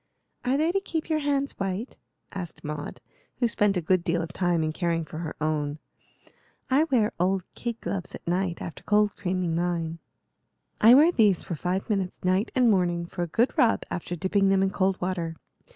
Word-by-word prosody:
"Are 255 +2 +1
they 315 +3 +2
to 390 - +1
keep 325 -4 -4
your 310 - +2
hands 280 -1 0
white?" 195 +5 -3 0.4
asked 180 -4 -7
Maud, 150 0 -6 0.4
who 240 - +2
spent 205 -3 +1
a - - 0
good 185 +1 +2
deal 170 0 0
of 165 +1 -7
time 175 -3 +1
in 155 0 -1
caring 165 -1 -1
for 155 - -8
her 165 -2 -5
own. 150 -1 -1 0.9
"I 285 +4 +4
wear 240 -9 +2
old 185 +1 +1
kid 235 -1 -4
gloves 190 -3 -4
at - - -13
night 175 0 -1
after 165 - -7
cold 210 -1 +2
creaming 180 -2 -1
mine." 170 -1 -1 0.8
"I 230 +3 +9
wear 310 +5 +7
these 210 - +3
for - - -5
five 180 +4 -2
minutes 195 -5 -2
night 185 +4 +2
and 250 -2 +4
morning, 175 -3 +1
for 175 +1 -6
a 175 - 0
good 230 +10 +1
rub, 230 - +4
after 175 0 -3
dipping 195 +3 +2
them 195 0 +3
in 190 - +1
cold 190 -1 +1
water. 175 -3 -2
185 Hz, 195 wpm, -26 LUFS, 170-220 Hz, 0.9 s, I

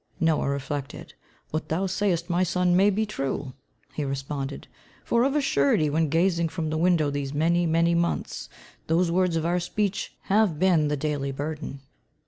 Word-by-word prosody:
Noah 160 -3 +2
reflected. 140 0 -4 0.4
"What 155 +1 -3
thou 175 +5 0
sayest, 185 -3 0
my 175 0 +1
son, 180 0 +2
may 195 +3 +5
be 210 +2 0
true," 135 -8 -3 0.4
he 150 - -3
responded, 135 0 -4 0.4
"for 235 0 +2
of 275 +2 +1
a 295 - +3
surety 145 - +2
when 160 0 +1
gazing 170 +1 +2
from 160 -2 -3
the 155 - -1
window 165 -4 +3
these 140 0 -3
many, 170 +3 +2
many 165 +1 +3
months, 170 0 -1 0.4
those 170 +2 +2
words 180 -1 +2
of 165 -1 0
our 175 +1 +1
speech 200 +2 -2
have 200 -5 +2
been 170 -3 +3
the 150 0 -1
daily 140 -1 -2
burden. 145 0 -5
165 Hz, 170 wpm, -26 LUFS, 145-180 Hz, 0.4 s, may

